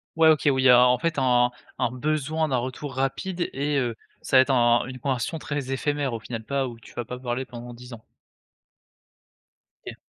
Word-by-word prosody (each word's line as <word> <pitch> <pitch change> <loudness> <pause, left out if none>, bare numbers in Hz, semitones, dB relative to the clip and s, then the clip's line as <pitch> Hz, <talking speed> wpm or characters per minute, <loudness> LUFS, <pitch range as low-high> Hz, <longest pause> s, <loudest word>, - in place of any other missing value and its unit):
Ouais, 160 0 +6
OK, 155 -2 +3
où 135 -1 +1
il - - +1
y - - +7
a, 125 -1 +8
en 125 0 +3
fait, 165 +5 -1
un 125 -2 +3 0.3
un 120 - 0
besoin 155 +4 -1
d'un 135 - 0
retour 130 +3 -5
rapide 175 +7 -2
et 145 +1 -1
heu, 120 -3 -2 0.3
ça 135 - +3
va - - +9
être 130 - -12
un 120 -2 +3
une 130 0 -7
conversion 135 +5 -2
très 145 -3 -4
éphémère 145 -1 -1
au 115 - -3
final, 115 -1 -6
pas 135 +2 -1
où 115 -1 -11
tu 115 - -16
vas 120 - -4
pas 125 +2 -7
parler 125 0 -3
pendant 120 -1 -9
10 125 +1 -12
ans. 115 -2 -11 1.8
OK. - - -8
130 Hz, 215 wpm, -25 LUFS, 120-145 Hz, 1.8 s, va